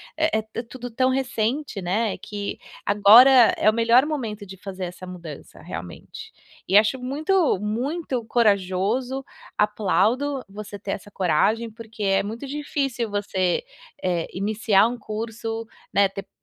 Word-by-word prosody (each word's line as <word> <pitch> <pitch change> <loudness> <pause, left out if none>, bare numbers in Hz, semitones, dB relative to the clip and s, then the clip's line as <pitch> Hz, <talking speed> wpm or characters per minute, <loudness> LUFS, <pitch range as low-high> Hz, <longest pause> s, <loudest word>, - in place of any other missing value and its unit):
é 310 -9 0
é - - -2
tudo 245 +1 -8
tão 255 +3 +2
recente, 255 -2 -1
né, 200 +4 0
que 205 -1 -5 0.3
agora 230 +5 +7
é - - +1
o - - -8
melhor 230 +4 +4
momento 225 -9 -4
de 190 0 -10
fazer 190 0 -6
essa 180 +1 -9
mudança 170 -5 -10
realmente. 85 0 -9 0.4
E 195 - +5
acho 220 +5 +3
muito, 300 - +1
muito 250 - -2
corajoso, 220 +4 +1 0.3
aplaudo 225 +6 +1
você 205 +1 -8
ter 195 0 -5
essa 200 - -6
coragem, 205 +6 +1
porque 220 -1 -9
é 195 -1 +3
muito 225 +7 -6
difícil 275 -4 -2
você, 195 - -1 0.4
eh, 175 -3 0
iniciar 205 +1 +2
um 245 +1 -4
curso, 225 0 -5 0.3
né, 200 0 +4
ter 195 +1 -8
220 Hz, 140 wpm, -24 LUFS, 195-250 Hz, 0.4 s, agora